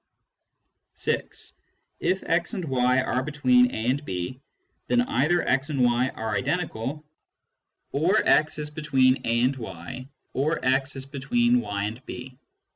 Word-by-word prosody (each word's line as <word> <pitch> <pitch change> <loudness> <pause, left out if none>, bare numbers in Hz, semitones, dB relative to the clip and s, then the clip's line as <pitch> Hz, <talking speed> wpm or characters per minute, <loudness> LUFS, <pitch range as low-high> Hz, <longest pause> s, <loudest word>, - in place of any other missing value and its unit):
(6) - - -3 0.5
If 185 +2 0
x 170 +6 0
and 185 -4 -3
y 125 -2 +2
are 130 -1 0
between 130 -4 +3
a 110 -2 -4
and 135 +4 +1
b, 95 +3 -4 0.5
then 245 - +3
either 175 - +2
* 135 +3 +1
and 140 -4 +1
y 120 +1 +3
are 110 -1 -2
identical, 150 - -2 0.9
or 175 +9 +2
x 155 0 +4
is 150 -1 -3
between 135 -4 +2
a 115 +1 +2
and 130 +2 +2
y, 110 +4 -8 0.2
or 150 +5 +1
x 135 +2 +1
is 135 0 -3
between 240 - +1
y 100 - -3
and 110 +5 -5
b. 125 +1 -8
135 Hz, 145 wpm, -26 LUFS, 125-155 Hz, 0.9 s, x